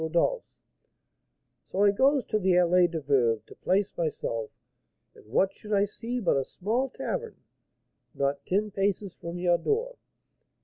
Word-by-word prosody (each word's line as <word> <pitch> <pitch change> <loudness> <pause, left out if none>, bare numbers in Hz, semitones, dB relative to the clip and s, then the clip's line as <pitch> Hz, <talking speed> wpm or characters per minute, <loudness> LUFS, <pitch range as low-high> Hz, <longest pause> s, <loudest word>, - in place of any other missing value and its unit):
Rodolph's.' 170 - -1 1.0
So 195 - -1
I 205 - +6
goes 265 +5 +3
to 215 - 0
the 190 -2 +2
Allée 180 0 +4
des 165 -2 -4
Veuves 125 -6 +2
to - - -13
place 195 +2 0
myself, 115 -9 -2 0.6
and - - -18
what 190 - +2
should 210 0 -7
I 200 0 +4
see 235 +4 -5
but 185 - +2
a 135 - +1
small 230 - -2
tavern, 470 - -4 0.8
not 140 0 -1
ten 205 +3 0
paces 195 0 -1
from 170 +1 -7
your 175 -1 +2
door! 475 +3 -1
190 Hz, 150 wpm, -28 LUFS, 170-215 Hz, 1.0 s, I